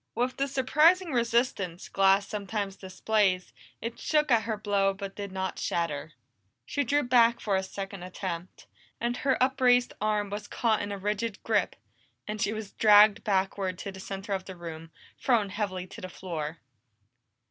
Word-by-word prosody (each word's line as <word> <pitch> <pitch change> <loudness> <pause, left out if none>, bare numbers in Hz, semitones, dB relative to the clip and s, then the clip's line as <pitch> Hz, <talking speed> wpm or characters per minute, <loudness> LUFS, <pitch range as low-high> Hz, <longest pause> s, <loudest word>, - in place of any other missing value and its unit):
With 245 +2 -1
the 275 - +1
surprising 305 +7 +3
resistance 235 -7 0
glass 195 0 +3
sometimes 200 -1 -3
displays, 190 -1 0 0.3
it 230 +1 -5
shook 300 -3 +1
at 230 -2 +5
her 220 -2 -2
blow 200 -2 +1
but 195 0 -7
did 200 -1 -6
not 190 0 -3
shatter. 155 -3 -2 0.5
She 285 - -1
drew 290 +4 +2
back 235 -1 +4
for 200 -2 0
a 190 - +2
second 195 0 -6
attempt, 180 -1 -6 0.3
and 240 +1 -1
her 270 -1 +1
upraised 250 -1 +3
arm 210 -1 0
was 205 0 -5
caught 225 -3 +1
in 205 - -4
a 200 - -3
rigid 210 +2 -2
grip, - - +1 0.5
and 210 0 -4
she - - +1
was 215 -2 -5
dragged 210 0 +6
backward 195 -2 0
to 200 - -6
the 190 - -11
center 195 +1 -5
of 190 -1 -3
the 190 - -8
room, 165 -2 -8 0.3
thrown 225 -6 +2
heavily 190 -2 -3
to 185 - -11
the 185 - -6
floor. 165 -4 -5
205 Hz, 170 wpm, -28 LUFS, 190-235 Hz, 0.5 s, dragged